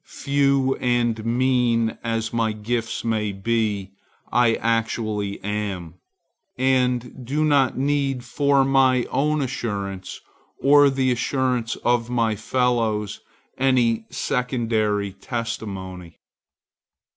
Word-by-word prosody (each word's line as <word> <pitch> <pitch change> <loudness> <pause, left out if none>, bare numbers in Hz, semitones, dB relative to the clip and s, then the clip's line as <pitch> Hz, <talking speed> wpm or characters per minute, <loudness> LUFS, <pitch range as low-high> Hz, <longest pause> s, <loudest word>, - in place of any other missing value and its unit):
Few 140 -1 +1
and 120 -3 0
mean 120 -1 +1
as 115 -1 -2
my 115 -2 +1
gifts 115 +2 -3
may 110 -2 0
be, 100 -1 -1 0.4
I 120 -2 +4
actually 110 -3 -1
am, 100 -5 -3 0.6
and 125 -1 0
do 145 +5 0
not 140 -4 +3
need 135 -2 0
for 140 +2 +2
my 130 -2 +3
own 150 +2 +1
assurance 100 -7 -4 0.4
or 145 +1 +6
the 135 -1 +1
assurance 125 -1 0
of 120 -1 +2
my 115 -3 +1
fellows 110 -2 0 0.4
any 120 -4 +2
secondary 110 -5 -1
testimony. 95 -6 -6
120 Hz, 100 wpm, -23 LUFS, 110-130 Hz, 0.6 s, or